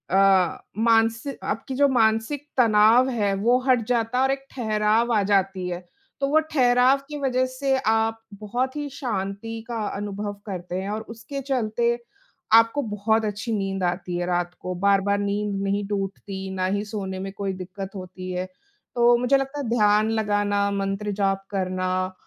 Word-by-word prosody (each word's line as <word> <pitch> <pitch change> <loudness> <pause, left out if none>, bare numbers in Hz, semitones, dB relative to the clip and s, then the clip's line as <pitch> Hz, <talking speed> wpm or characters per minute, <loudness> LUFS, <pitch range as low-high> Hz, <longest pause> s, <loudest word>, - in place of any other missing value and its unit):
अ, 195 -2 +4 0.2
मानसि 225 +3 +2
आपकी 255 +5 -3
जो 285 +1 +4
मानसिक 235 +4 +1
तनाव 230 +2 +5
है 205 -5 0
वो 240 +5 +3
हट 250 -2 +4
जाता 240 0 0
है 260 - +4
और 265 - +3
एक 270 0 -3
ठहराव 220 0 +1
आ 210 - +3
जाती 195 -2 +1
है। 175 +1 -5 0.4
तो 275 - +1
वो 310 +2 +4
ठहराव 250 0 +4
की 295 - -5
वज़ह 255 -1 +1
से 265 +1 0
आप 225 0 +2 0.2
बहुत 245 +6 -2
ही 295 -1 -3
शांति 225 -2 -4
का 235 -1 -4 0.2
अनुभव 205 0 -4
करते 180 -3 -5
हैं 195 - -4
और 215 +1 -3
उसके 235 +5 -6
चलते 235 -1 +1 0.6
आपको 230 +5 +5
बहुत 220 0 0
अच्छी 210 +3 -3
नींद 195 -1 -2
आती 175 0 -2
है। 175 - -1
रात 175 0 -1
को 185 - -3
बार-बार 200 0 +3
नींद 200 0 -1
नहीं 200 +1 0
टूटती, 195 -1 -4
ना 185 0 0
ही 200 +2 0
सोने 190 -3 -5
में 195 0 -5
कोई 195 -1 -3
दिक्कत 190 +1 -7
होती 185 0 -7
है। 180 0 -2 0.5
तो 240 0 +5
मुझे 250 +3 +3
लगता 270 +2 -4
है 250 -5 -3
ध्यान 215 -1 +3
लगाना, 205 -2 +1
मंत्र 195 +1 -2
जाप 195 -1 0
करना 185 -1 -1
210 Hz, 170 wpm, -24 LUFS, 195-240 Hz, 0.6 s, तनाव